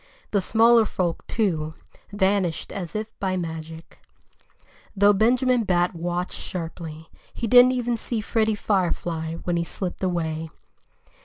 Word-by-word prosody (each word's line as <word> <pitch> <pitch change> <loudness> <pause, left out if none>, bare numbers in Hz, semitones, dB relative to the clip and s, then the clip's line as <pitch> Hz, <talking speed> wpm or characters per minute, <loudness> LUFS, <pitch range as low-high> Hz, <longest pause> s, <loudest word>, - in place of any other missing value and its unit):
The 200 - +2
smaller 230 +3 +5
folk, 175 -5 -2
too, 160 -8 -1 0.4
vanished 190 -4 0
as 180 -3 -6
if 215 +1 -3
by 190 -1 -1
magic. 160 -1 -7 1.0
Though 205 +1 +5
Benjamin 245 +3 +3
Bat 180 -2 +1
watched 175 +1 -3
sharply, 165 -2 -6 0.2
he - - -3
didn't 250 +2 +7
even 245 -1 -1
see 230 0 -2
Freddie 220 0 +1
Firefly 170 -5 -1
when 175 -1 0
he 170 - 0
slipped 180 +1 -5
away. 165 -3 -2
185 Hz, 130 wpm, -24 LUFS, 165-220 Hz, 1.0 s, didn't